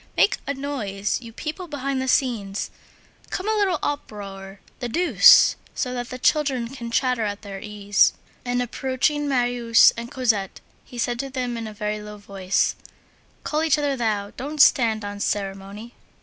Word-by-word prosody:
Make - - +4
a 280 - -1
noise, 220 -8 -3
you 230 -2 -10
people 315 - -6
behind 275 -3 -2
the 260 - -3
scenes. 230 -8 0 0.6
Come, 380 +2 -4
a 435 - +2
little 400 -5 +2
uproar, 195 -8 -5 0.2
the 245 -2 -3
deuce! 350 +9 +6 0.2
so 250 -2 -2
that 245 -1 -4
the 255 - -6
children 260 -3 +1
can 240 -3 -7
chatter 250 0 +1
at 205 0 -4
their 195 -1 -7
ease." 205 -1 +2 0.3
And, 245 0 0
approaching 265 +4 -1
Marius 245 -3 +4
and 235 +1 -6
Cosette, 220 -8 0 0.2
he 245 - -12
said 240 0 -1
to 275 - -3
them 250 -2 -3
in 230 -1 -5
a - - -7
very 210 0 -3
low 210 0 -9
voice: 195 -2 -1 0.7
"Call 305 +1 -1
each 315 -2 +3
other 290 -2 0
thou. 210 -5 -1
Don't 295 +3 -6
stand 225 -6 +4
on 205 0 -6
ceremony." 200 +3 -4
240 Hz, 165 wpm, -23 LUFS, 205-270 Hz, 0.7 s, deuce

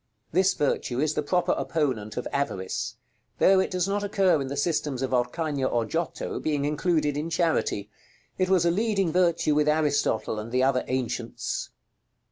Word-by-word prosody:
This 190 +3 +3
virtue 130 -3 -1
is 155 +1 +1
the - - 0
proper 175 +4 +1
opponent 125 -10 -1
of 125 - -2
Avarice; 95 -10 -2 0.4
though 190 0 +5
it 190 - +1
does 180 -1 0
not 205 +1 -1
occur 195 -6 +2
in 135 - -3
the 140 +1 -4
systems 145 -4 -1
of 130 - -2
Orcagna 135 +2 0
or 120 -2 0
Giotto, 165 +8 -3
being 145 -2 -1
included 150 0 +1
in 150 +3 -2
Charity. 165 - 0 0.5
It 185 0 +2
was 185 -3 +3
a 170 - +4
leading 195 -2 +1
virtue 170 -3 +2
with 150 0 +2
Aristotle 145 -8 +1
and 110 +2 -7
the 130 +1 +2
other 130 -1 +2
ancients. 130 -2 -3
150 Hz, 170 wpm, -26 LUFS, 130-175 Hz, 0.5 s, though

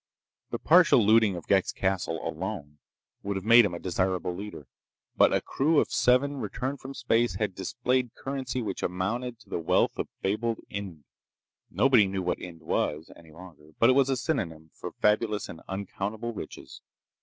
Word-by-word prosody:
The - - -3
partial 165 - +5
looting 110 -2 +4
of 85 - -7
Ghek's 95 -2 +2
castle, 95 -4 -2
alone, 75 +1 -5 0.4
would 100 0 -3
have 95 0 -4
made 115 0 +8
him 90 - -2
a - - -6
desirable 90 0 -1
leader. 100 -6 -8 0.5
But - - +5
a - - +2
crew 150 +3 +2
of - - 0
seven, 140 +3 +2
returned 130 +4 -4
from 135 +1 -9
space, 120 -1 +1
had 105 -3 -1
displayed 125 +5 -1
currency 130 -2 -4
which 100 -3 -4
amounted 115 +7 -2
to - - -20
the - - -1
wealth 80 - +1
of - - -1 0.2
fabled 110 +3 0
Ind. 95 -7 -6 0.7
Nobody 125 -6 +4
knew 95 -1 -3
what 90 - -1
Ind 85 -2 -9
was, 80 0 -2
any 80 -2 -16
longer, 80 -2 -14
but 115 +2 +5
it - - +4
was 135 0 +3
a 135 - +1
synonym 80 - -3
for - - -7
fabulous 105 0 +1
and 80 - -10
uncountable 100 +4 -4
riches. 90 - -9
105 Hz, 175 wpm, -27 LUFS, 90-125 Hz, 0.7 s, made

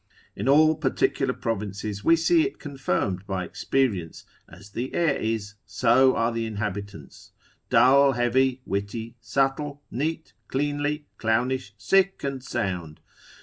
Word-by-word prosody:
In 105 +7 -2
all 155 +2 +6
particular - - 0
provinces 105 -2 -4
we 165 - +6
see 320 - +3
it 385 +5 -2
confirmed 100 - -2
by 95 -2 -2
experience, 100 -9 -1 0.2
as 100 +2 -14
the 125 +5 -4
air 170 -2 +2
is, 110 -2 -2
so 130 +2 +3
are 115 +1 +1
the 115 -1 -2
inhabitants, 100 -6 -6 0.4
dull, 140 +2 +5
heavy, 125 +1 +1
witty, 100 +4 -4
subtle, 135 +4 -1
neat, 160 +6 -3
cleanly, 145 +2 -1
clownish, 115 0 0
sick, 195 - +2
and 135 -2 -3
sound. 90 -11 -3
120 Hz, 125 wpm, -25 LUFS, 100-140 Hz, 0.4 s, all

